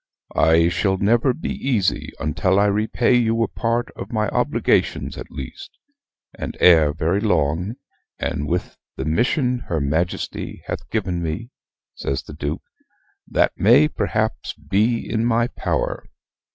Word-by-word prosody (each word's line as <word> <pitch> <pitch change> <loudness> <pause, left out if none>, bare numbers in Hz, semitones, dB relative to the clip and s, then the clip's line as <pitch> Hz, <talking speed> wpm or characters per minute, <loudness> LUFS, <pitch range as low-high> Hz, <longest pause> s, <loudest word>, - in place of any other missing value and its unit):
I 80 +1 +5
shall 95 +2 +1
never 115 +7 +3
be 145 - -4
easy 115 -9 0
until 95 +6 +1
I 100 - +4
repay 110 +4 +2
you 115 -1 +2
a - - 0
part 120 +2 -1
of - - -8
my 110 -3 0
obligations - - +1
at - - -8
least; 65 -2 -9 0.6
and - - -6
ere 80 -4 +6
very 80 +5 0
long, 90 0 0 0.4
and 75 - -2
with 90 +4 -2 0.2
the - - -4
mission 125 - +1
her 80 - -1
Majesty 80 +5 -2
hath 75 - -5
given 95 -6 -1
me," 85 +10 -4 0.4
says 70 +1 -3
the - - -10
Duke, 75 0 -4 0.6
"that - - +2
may 125 +9 +6
perhaps 110 - -2
be 110 +4 0
in 110 0 0
my 120 0 +2
power. - - -2
100 Hz, 140 wpm, -22 LUFS, 80-115 Hz, 0.6 s, ere